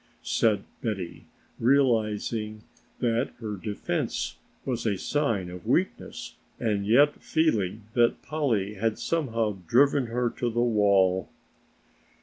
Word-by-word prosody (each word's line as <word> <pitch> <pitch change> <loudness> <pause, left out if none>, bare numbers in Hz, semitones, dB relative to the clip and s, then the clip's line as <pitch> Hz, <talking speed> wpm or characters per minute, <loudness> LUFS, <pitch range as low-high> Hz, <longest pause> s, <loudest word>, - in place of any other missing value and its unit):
said 110 -3 +2 0.2
Betty, 100 -6 -4 0.3
realizing 110 -4 +1 0.4
that 120 +1 +1
her 110 -3 -4
defense 105 +1 -3 0.3
was 125 -3 -2
a 100 -3 +1
sign 115 -8 0
of 90 -1 -9
weakness - - -1 0.2
and 105 -3 0
yet 145 +7 +4
feeling 110 - 0
that 120 -1 +2
Polly 120 -10 0
had 110 +2 -1
somehow 115 -11 -1
driven 135 - +4
her 120 +1 0
to 120 - -2
the 120 +1 -2
wall. 100 -5 +3
115 Hz, 115 wpm, -27 LUFS, 105-125 Hz, 0.4 s, yet